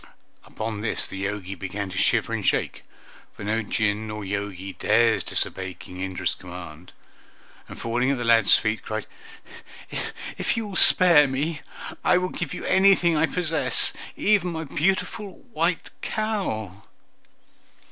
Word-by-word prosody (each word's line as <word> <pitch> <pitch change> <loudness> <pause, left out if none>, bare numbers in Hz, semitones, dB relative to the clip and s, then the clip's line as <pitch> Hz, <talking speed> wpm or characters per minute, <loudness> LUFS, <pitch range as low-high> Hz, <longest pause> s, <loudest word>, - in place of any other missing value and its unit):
Upon 110 -1 -5
this 110 - -1
the 95 0 -6
Jogi 100 -2 -4
began 100 +1 -5
to 90 - -6
shiver - - +2
and - - -2
shake - - 0 0.5
(for - - -9
no 110 +2 0
Jinn 110 0 -1
or 105 -1 -5
Jogi 95 -1 -4
dares 115 +1 +3
disobey 95 -1 0
King 90 0 -10
Indra's 95 -1 -2
command), 90 -2 -10 0.8
and, - - -10
falling 120 +3 0
at 140 - +1
the 120 - -3
lad's 115 -3 +6
feet, 110 0 -1
cried, 110 -1 -4 1.3
"If - - 0
you 225 - -2
will 200 -2 -7
spare 170 -6 +7
me 150 +4 -2 0.4
I 180 - +4
will 180 0 -1
give 175 -6 -5
you - - -6
anything 190 -3 +4
I 160 +1 +3
possess, 165 -2 +1 0.2
even 195 -5 +2
my 160 0 -4
beautiful 195 +6 -1 0.2
white 170 0 0
cow!" 185 - -3
115 Hz, 145 wpm, -24 LUFS, -, 1.3 s, spare